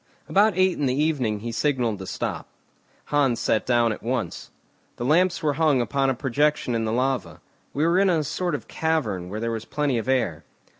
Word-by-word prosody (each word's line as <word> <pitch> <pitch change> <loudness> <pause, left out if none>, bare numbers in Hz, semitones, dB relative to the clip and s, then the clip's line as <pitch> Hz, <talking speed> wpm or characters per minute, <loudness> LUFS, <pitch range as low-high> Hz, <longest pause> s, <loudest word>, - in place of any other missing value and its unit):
About 205 -1 +3
eight 185 -1 +2
in 145 - +1
the 130 +2 0
evening 130 -9 0
he 115 +1 -4
signalled 120 -5 0
to 95 - -7
stop. - - -4 0.7
Hans 135 -5 +2
sat 110 - 0
down 120 -2 +3
at 110 - -5
once. 120 -7 -3 0.5
The 120 - -4
lamps 175 +4 +2
were 150 -2 +2
hung 150 -3 +2
upon 135 +2 +1
a 135 - 0
projection 140 0 0
in 115 -1 0
the 110 - -1
lava; 130 0 -1 0.3
we 150 +3 0
were 170 +3 +3
in 195 -1 +4
a 165 -4 +2
sort 175 +4 -2
of - - -7
cavern 110 - -1
where 105 +3 -4
there 115 +1 -2
was 115 0 -4
plenty 145 -4 0
of 115 - -6
air. 130 -2 0
135 Hz, 205 wpm, -24 LUFS, 115-155 Hz, 0.7 s, in